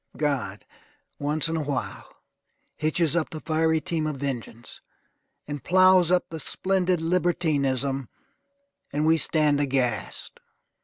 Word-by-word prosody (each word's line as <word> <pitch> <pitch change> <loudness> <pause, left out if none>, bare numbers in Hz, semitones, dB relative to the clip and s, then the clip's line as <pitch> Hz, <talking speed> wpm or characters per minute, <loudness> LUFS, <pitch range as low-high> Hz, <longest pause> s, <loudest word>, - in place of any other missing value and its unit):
God, 135 -10 -2 0.5
once 150 +2 0
in 165 - -2
a 160 - 0
while, 145 -2 -4 0.6
hitches 155 +1 0
up 165 -2 0
the 155 - -6
fiery 160 0 +1
team 165 -2 -2
of 155 - -3
vengeance, 125 -4 -6 0.7
and 145 -3 -5
ploughs 185 0 +5
up 180 0 +2
the 160 - -5
splendid 185 +3 0
libertinism, 145 -6 0 0.8
and 150 +2 0
we 160 +1 +4
stand 150 -2 +2
aghast. 135 -3 -1
155 Hz, 120 wpm, -25 LUFS, 140-170 Hz, 0.8 s, ploughs